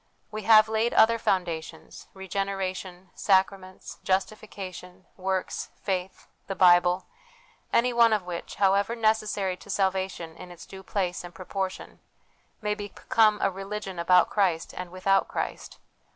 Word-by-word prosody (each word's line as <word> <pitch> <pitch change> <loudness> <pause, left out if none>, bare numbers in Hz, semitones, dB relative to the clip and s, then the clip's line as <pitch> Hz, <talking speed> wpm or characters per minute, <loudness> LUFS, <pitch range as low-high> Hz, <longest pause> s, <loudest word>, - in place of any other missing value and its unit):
We 215 0 -5
have 215 -1 +8
laid 220 +2 0
other 230 +1 +5
foundations 175 -6 -3
regeneration, 190 -1 -4
sacraments, 190 -1 0
justification, 190 -2 -4
works, 190 0 -3
faith, 190 -1 -4 0.2
the 195 - -3
Bible 180 0 +5 0.7
any 245 +1 +3
one 235 -1 +5
of 210 -3 +1
which, 175 -1 -6
however 200 +3 +2
necessary 215 -4 0
to 205 - -16
salvation 190 -4 -1
in 180 - -10
its 175 -1 -12
due 190 - -11
place 185 -2 -2
and 175 0 -10
proportion, 190 0 -5 0.6
may 210 0 +1
become 210 +1 +1
a - - +2
religion 195 -1 -6
about 180 +1 +4
Christ 180 -6 0
and 180 -1 -6
without 190 +2 +1
Christ. - - -5
190 Hz, 130 wpm, -27 LUFS, 180-210 Hz, 0.7 s, have